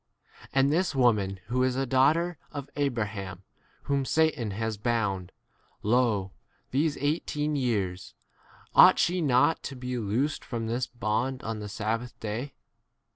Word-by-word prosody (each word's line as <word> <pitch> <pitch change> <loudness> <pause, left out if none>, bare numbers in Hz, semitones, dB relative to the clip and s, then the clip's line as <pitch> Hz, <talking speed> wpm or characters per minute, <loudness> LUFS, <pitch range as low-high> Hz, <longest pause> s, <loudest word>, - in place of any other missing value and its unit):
And 135 +2 +3
this 175 -2 +1
[woman], 105 -7 +2
who 125 +1 +1
is 130 -1 +2
a 135 +1 0
daughter 145 +6 +2
of 145 -1 -7
Abraham, 105 -9 -2 0.4
whom 140 -1 0
Satan 155 -5 +1
has 110 +2 -2
bound, 100 -5 -1 0.5
lo, 110 -4 +2 0.4
these 145 +3 +1
eighteen 150 0 -1
years, 100 -9 -2 0.6
ought - - +8
she 180 +1 +2
not 145 +2 +3
to 140 - -6
be 125 0 -4
loosed 120 +8 -1
from 115 -2 -4
this 120 +2 -1
bond 120 +3 -2
on 110 -1 -3
the!? 105 -1 -6
sabbath 115 +4 -3
day 115 +6 -4
125 Hz, 135 wpm, -28 LUFS, 105-140 Hz, 0.6 s, ought